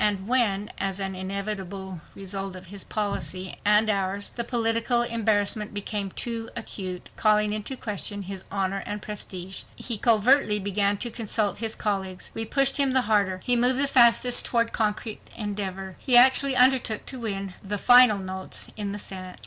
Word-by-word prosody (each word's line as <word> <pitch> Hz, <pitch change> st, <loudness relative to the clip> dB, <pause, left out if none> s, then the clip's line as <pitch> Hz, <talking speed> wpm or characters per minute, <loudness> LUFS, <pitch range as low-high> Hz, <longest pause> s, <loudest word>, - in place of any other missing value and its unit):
And 200 Hz, -2 st, 0 dB
when, 210 Hz, -5 st, +1 dB
as 195 Hz, 0 st, -1 dB
an 195 Hz, 0 st, -3 dB
inevitable 190 Hz, -1 st, -5 dB
result 195 Hz, -1 st, -5 dB
of 185 Hz, 0 st, -10 dB
his 200 Hz, -, -5 dB
policy—and 205 Hz, +1 st, 0 dB
ours—the 200 Hz, +3 st, -2 dB
political 235 Hz, 0 st, +1 dB
embarrassment 215 Hz, -2 st, -1 dB
became 205 Hz, -1 st, -3 dB
too 230 Hz, +3 st, -5 dB
acute, 190 Hz, -6 st, -6 dB
calling 210 Hz, -1 st, +2 dB
into 215 Hz, +5 st, -4 dB
question 205 Hz, -2 st, -3 dB
his 190 Hz, 0 st, -7 dB
honor 195 Hz, 0 st, -2 dB
and 205 Hz, 0 st, -4 dB
prestige, 190 Hz, -3 st, -4 dB
he 230 Hz, -4 st, 0 dB
covertly 230 Hz, 0 st, +3 dB
began 200 Hz, 0 st, +1 dB
to 240 Hz, +3 st, -3 dB
consult 215 Hz, -3 st, 0 dB
his 225 Hz, -1 st, 0 dB
colleagues. 190 Hz, -3 st, -3 dB
We 225 Hz, -, -4 dB
pushed 275 Hz, +4 st, +2 dB
him 275 Hz, -2 st, +3 dB
the 260 Hz, -, +4 dB
harder. 200 Hz, -5 st, 0 dB
He 245 Hz, -, +1 dB
moved 250 Hz, +2 st, +3 dB
the 280 Hz, -, +4 dB
faster 245 Hz, -2 st, +5 dB
toward 230 Hz, -1 st, +2 dB
concrete 215 Hz, 0 st, -2 dB, 0.2 s
endeavor. 195 Hz, -3 st, -4 dB
He 250 Hz, -3 st, +4 dB
actually 265 Hz, +2 st, +6 dB
undertook 250 Hz, -4 st, +2 dB
to 260 Hz, -, -7 dB
win 195 Hz, -4 st, -4 dB
the 205 Hz, +1 st, -2 dB
final 245 Hz, 0 st, +6 dB
votes 190 Hz, -1 st, -4 dB
in 205 Hz, -2 st, -3 dB
the -, -, -4 dB
Senate. 185 Hz, -2 st, -6 dB
210 Hz, 160 wpm, -25 LUFS, 195-230 Hz, 0.2 s, actually